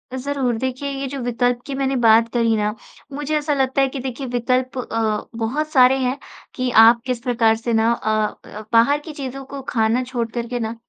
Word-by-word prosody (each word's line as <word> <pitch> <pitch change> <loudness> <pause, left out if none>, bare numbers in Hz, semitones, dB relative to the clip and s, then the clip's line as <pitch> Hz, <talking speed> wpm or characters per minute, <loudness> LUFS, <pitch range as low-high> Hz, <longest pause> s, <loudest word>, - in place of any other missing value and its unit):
ज़रूर। 260 -2 -1
देखिए 260 +3 -3
ये 275 0 -4
जो 275 +1 -5
विकल्प 245 0 0
की 280 - -5
मैंने 270 0 -1
बात 230 -1 +5
करी 230 -2 +2
ना? 210 +1 -1 0.4
मुझे 295 +2 -2
ऐसा 295 0 -1
लगता 270 0 +1
है 270 - +3
कि 265 0 -6
देखिए 260 +1 -5
विकल्प 255 +2 -1
अ, 225 -3 -2
बहुत 255 +7 -2
सारे 260 -1 +5
हैं 255 +2 -1 0.4
कि 255 -1 -1 0.2
आप 235 +1 +5
किस 250 -2 -2
प्रकार 230 -2 +2
से 230 +1 -3
ना 225 +1 +3
अ 215 -2 -2
अ, - - -7
बाहर 275 +6 +4
की 310 +1 -9
चीज़ों 270 -1 -6
को 280 0 -8
खाना 225 +2 +1
छोड़कर 235 -2 -4
के 245 0 -3
ना 225 0 -3
250 Hz, 205 wpm, -21 LUFS, 230-270 Hz, 0.4 s, बात